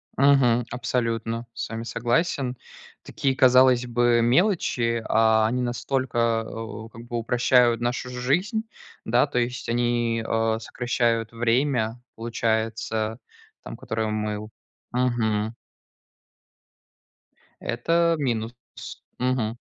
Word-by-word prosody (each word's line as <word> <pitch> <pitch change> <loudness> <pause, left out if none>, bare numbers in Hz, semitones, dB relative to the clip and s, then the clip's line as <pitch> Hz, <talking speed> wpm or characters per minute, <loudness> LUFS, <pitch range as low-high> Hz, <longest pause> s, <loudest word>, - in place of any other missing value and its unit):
Мгм. 130 -4 +4
Абсолютно 115 -2 -2
с - - -5
вами 115 0 -5
согласен. 125 +2 -1 0.5
Такие, 135 -1 -1
казалось 130 -1 +5
бы, 120 0 +2
мелочи, 120 - +1
а 110 0 +4
они 125 +3 -1
настолько, 120 -2 0
э, - - -8
у 110 0 -7
как 115 +1 -12
бы 120 0 -4
упрощают 120 0 +3
нашу 125 +1 -2
жизнь. 145 - 0 0.4
Да. 120 +5 +3
То 140 - -4
есть 125 0 -3
они, 120 -1 0
э, 115 0 +1
сокращают 115 -1 -1
время, 120 0 0
получается, 110 -1 -2 0.4
там, - - -7
которое 110 0 -3
мы 105 -1 -2
у 105 +1 -8 0.4
Мгм. 115 -3 0 2.1
Это 165 +8 +1
минус. 115 -4 -1 0.7
Мгм. 125 -3 0
120 Hz, 105 wpm, -24 LUFS, 115-125 Hz, 2.1 s, казалось